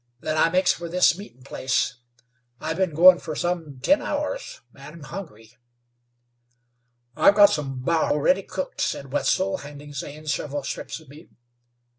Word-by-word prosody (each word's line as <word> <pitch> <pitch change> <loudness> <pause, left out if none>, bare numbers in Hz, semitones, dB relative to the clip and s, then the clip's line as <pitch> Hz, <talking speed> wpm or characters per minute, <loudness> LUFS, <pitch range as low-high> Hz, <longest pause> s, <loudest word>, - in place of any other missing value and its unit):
Then 155 - -2
I 155 +1 +4
makes 185 +2 +3
for 170 0 -7
this 180 0 +4
meetin' 150 -10 -12
place. 130 -1 -1 0.6
I've 160 +1 -3
been 185 -5 0
goin' 175 +2 +8
for 155 - -6
some 165 -5 -3
ten 290 +1 +4
hours, - - -4
and 150 - -12
am 165 - -12
hungry." 135 - -9 1.6
"I've 200 - +5
got 205 -1 +7
some 135 -6 -3
bar 160 0 +1
ready 185 +6 +3
cooked," 185 -1 -5
said 140 -7 -3
Wetzel, 190 +5 +1
handing 145 -1 -11
Zane 150 +3 -7
several 145 -2 -3
strips 135 - -5
of 160 - -18
meat. 150 +5 -15
160 Hz, 155 wpm, -24 LUFS, 145-185 Hz, 1.6 s, goin